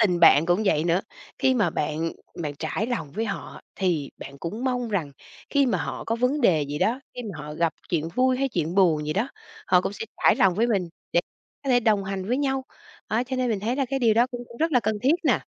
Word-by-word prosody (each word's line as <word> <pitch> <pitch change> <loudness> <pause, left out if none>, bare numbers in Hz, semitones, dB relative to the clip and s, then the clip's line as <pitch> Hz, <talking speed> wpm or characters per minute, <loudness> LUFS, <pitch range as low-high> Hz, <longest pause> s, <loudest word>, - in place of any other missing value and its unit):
tình 180 -6 +3
bạn 165 -1 +7
cũng 175 +5 +2
vậy 155 -5 +2
nữa, 175 +2 +2 0.4
khi 260 -1 +3
mà 205 -8 +2
bạn 155 +2 -2 0.3
bạn 145 -2 -3
trải 180 +7 -2
lòng 235 - -3
với 220 +3 -1
họ 200 -3 -5 0.2
thì 170 -7 0
bạn 140 0 -9
cũng 210 - -5
mong 250 -2 0
rằng 170 -10 -2 0.4
khi 280 -1 +3
mà 195 -8 +1
họ 145 - -4
có 230 - -1
vấn 250 +5 +1
đề 165 - +4
gì 145 +1 -4
đó, 245 +4 +1
khi 245 - -5
mà 160 - -9
họ 150 0 -7
gặp 165 0 +1 0.2
chuyện 165 -2 0
vui 255 0 +3
hay 275 0 +1
chuyện 170 -6 -2
buồn 165 -6 +3
gì 155 - 0
đó, 220 +8 0 0.4
họ 180 -1 +5
cũng 195 - -3
sẽ 215 - -5 0.2
trải - - +6
lòng 185 -2 +4
với 225 +4 +2
mình 195 -7 0 0.2
để 170 - +4 0.4
có 270 - 0
thể 245 - +5
đồng 210 -4 +2
hành 195 -1 -3
với 250 +3 +1
nhau. 270 -2 0 0.4
Đó, 220 +3 +1
cho 260 +1 -4
nên 255 -1 +1
mình 210 -3 -1
thấy 235 +6 -1
là 275 - +1
cái 270 +1 0
điều 230 -4 +4
đó 235 +3 +4
cũng 245 -1 -5
cũng 235 - -12
rất 325 +3 0
là 250 - +5
cần 215 -1 0
thiết 275 +5 +5
nè. 275 - +4
210 Hz, 260 wpm, -25 LUFS, 170-250 Hz, 0.4 s, bạn